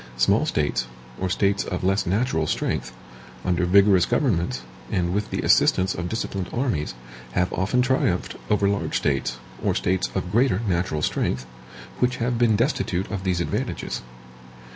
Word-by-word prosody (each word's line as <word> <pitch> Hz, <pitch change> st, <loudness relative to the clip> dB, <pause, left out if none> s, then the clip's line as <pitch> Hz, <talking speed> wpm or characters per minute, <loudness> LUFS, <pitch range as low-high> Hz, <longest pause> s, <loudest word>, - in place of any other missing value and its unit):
Small -, -, +3 dB
states, 70 Hz, -4 st, 0 dB, 0.3 s
or 95 Hz, -, -1 dB
states 100 Hz, +2 st, +1 dB
of 90 Hz, -, -4 dB
less 95 Hz, 0 st, +1 dB
natural 90 Hz, -5 st, +1 dB
strength, 65 Hz, -, -1 dB, 0.5 s
under 90 Hz, -1 st, +1 dB
vigorous 95 Hz, 0 st, +5 dB
governments, 85 Hz, -, 0 dB, 0.3 s
and 90 Hz, -1 st, 0 dB
with 105 Hz, +1 st, -1 dB
the -, -, -2 dB
assistance 95 Hz, +1 st, +4 dB
of 85 Hz, 0 st, -4 dB
disciplined 100 Hz, -4 st, -3 dB
armies, 120 Hz, -, -1 dB, 0.4 s
have 90 Hz, +4 st, +1 dB
often 105 Hz, +8 st, +1 dB
triumphed 125 Hz, -8 st, 0 dB
over 100 Hz, -1 st, +3 dB
large 100 Hz, 0 st, 0 dB
states, 65 Hz, -3 st, 0 dB, 0.3 s
or -, -, +1 dB
states 95 Hz, +1 st, 0 dB
of 95 Hz, -2 st, -2 dB
greater 120 Hz, -2 st, +3 dB
natural 85 Hz, -4 st, 0 dB
strength, 65 Hz, -3 st, 0 dB, 0.5 s
which 125 Hz, 0 st, +2 dB
have 120 Hz, 0 st, -1 dB
been 115 Hz, -3 st, +4 dB
destitute 105 Hz, -, 0 dB
of 95 Hz, -3 st, -3 dB
these 90 Hz, -2 st, 0 dB
advantages. 85 Hz, -, -3 dB
95 Hz, 150 wpm, -24 LUFS, 85-105 Hz, 0.5 s, vigorous